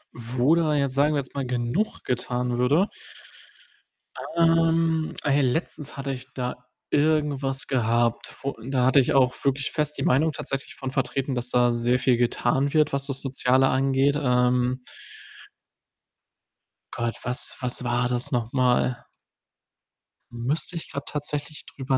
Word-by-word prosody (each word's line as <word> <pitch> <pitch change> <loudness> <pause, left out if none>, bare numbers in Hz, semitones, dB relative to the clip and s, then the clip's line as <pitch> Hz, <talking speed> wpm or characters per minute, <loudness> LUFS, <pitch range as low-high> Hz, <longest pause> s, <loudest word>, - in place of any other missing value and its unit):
Wo 125 +5 +1
da 160 -3 +2
jetzt, 140 -2 0
sagen 145 +2 +2
wir - - +1
jetzt 130 - -6
mal, 140 -2 -3
genug 125 - -2
getan 125 0 -2
würde 150 +11 +3 1.5
Ähm, 165 -1 +2
ey, 145 0 +2
letztens 145 +2 0
hatte 135 0 -3
ich 130 0 -9
da 125 -1 -5 0.3
irgendwas 145 -3 +1
gehabt, 120 -2 0
wo 140 0 -3
da 130 -2 +1
hatte 130 +2 +5
ich 130 - +2
auch 130 -2 +4
wirklich 135 0 0
fest 150 -1 0
die - - -2
Meinung 155 +5 +3
tatsächlich 135 -1 -5
von 135 -1 -5
vertreten, 135 0 -1
dass 125 0 -1
da 120 -1 +3
sehr 120 +1 +1
viel 125 -1 +2
getan 130 +4 0
wird, 155 -2 +3
was 140 0 0
das 135 -1 -1
Soziale 130 0 +3
angeht. 135 +2 +2
Ähm 125 0 +1 2.1
Gott, 115 0 -2
was 125 +1 +1
was 125 -1 -1
war 120 0 0
das 125 +4 -2
nochmal? 125 +1 +1 1.3
Müsste 130 +9 -1
ich 165 - -5
grad 140 0 -6
tatsächlich 150 0 -4
drüber 135 -1 -2
135 Hz, 140 wpm, -25 LUFS, 125-145 Hz, 2.1 s, hatte